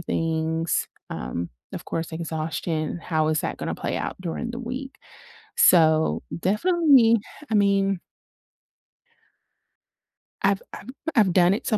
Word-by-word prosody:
things? 160 0 -1 0.2
Um, 85 +8 -4 0.2
of - - -6
course, 165 0 -4
exhaustion. 160 0 -3
How 155 -2 0
is 155 -1 +1
that - - -3
gonna - - -3
play - - -3
out - - -3
during 185 +7 -4
the 240 - -6
week? 260 +3 -6 0.6
So, 160 -2 +5 0.2
definitely, 260 - +4 0.3
I 220 - +2
mean 195 -2 +2 2.4
I've 195 0 +2
I'm - - -9 0.3
I've 200 -6 +4
done 180 0 +5
it 210 - -4
so 215 - +2
180 Hz, 120 wpm, -24 LUFS, 160-220 Hz, 2.4 s, So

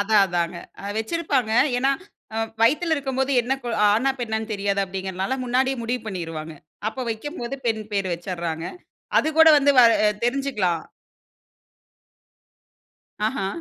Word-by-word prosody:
அதான் 205 0 +4
அதான்ங்க. 175 -1 -2 0.2
அ - - -9
வச்சிருப்பாங்க. 260 -2 0 0.3
ஏன்னா 270 +2 +2 0.7
வயித்துல 310 +8 +3
இருக்கும்போது 265 -1 -1
என்ன 245 +3 -2
கு 245 - -5 0.2
ஆணா, 255 +6 +2
பெண்ணான்னு 220 -1 -3
தெரியாது 200 -1 0
அப்டிங்கறனால 190 +4 -3
முன்னாடியே 260 +2 +1
முடிவு 245 +2 -2
பண்ணீருவாங்க. 165 -5 -5 0.3
அப்போ 225 +4 -6
வெக்கும்போது, 240 +2 -5
பெண் 220 -2 0
பேரு 195 -2 0
வச்சிர்றாங்க. 170 -2 -4 0.5
அது 315 - +2
கூட 320 0 +9
வந்து 285 0 +4
வ - - +10 0.2
அ - - +6 0.2
தெரிஞ்சுக்கலாம். 240 -10 0 2.5
ஆஹா. 220 -5 -2
220 Hz, 125 wpm, -23 LUFS, 190-265 Hz, 2.5 s, வ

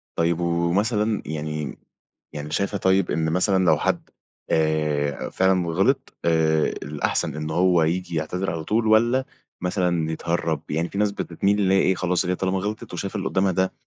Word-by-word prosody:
طيب 85 0 +1
ومثلًا 100 +6 +1
يعني 75 -1 -4 0.6
يعني 75 0 -6
شايفة 100 +3 -1
طيب 95 -1 +2
إن 80 +1 0
مثلًا 95 +2 +2
لو 80 -3 +5
حد - - -1 0.4
آآ، 75 -2 0
فعلًا 95 -2 +2
غلط 85 +4 +1
آآ، 80 -2 +3
الأحسن 75 0 -2
إن 75 0 -4
هو 90 0 +3
ييجي 85 +2 -1
يعتذر 80 +4 -2
على 80 -2 -4
طول 110 +6 0
والّا 120 +4 +3 0.4
مثلًا 90 -3 0
يتهرب؟ 80 -2 -1
يعني 80 +3 -1
فيه 100 - -4
ناس 105 -1 +2
بتتميل 100 +2 -1
اللي 95 -2 +3
هي 95 - +5
إيه 95 0 +3
خلاص 90 0 0
هي 90 +1 0
طالما 95 +1 -1
غلطت 105 +1 -5
وشايفة 100 +4 -4
اللي 95 - -2
قدامها 95 0 +2
ده 95 +1 0
90 Hz, 170 wpm, -23 LUFS, 80-95 Hz, 0.6 s, لو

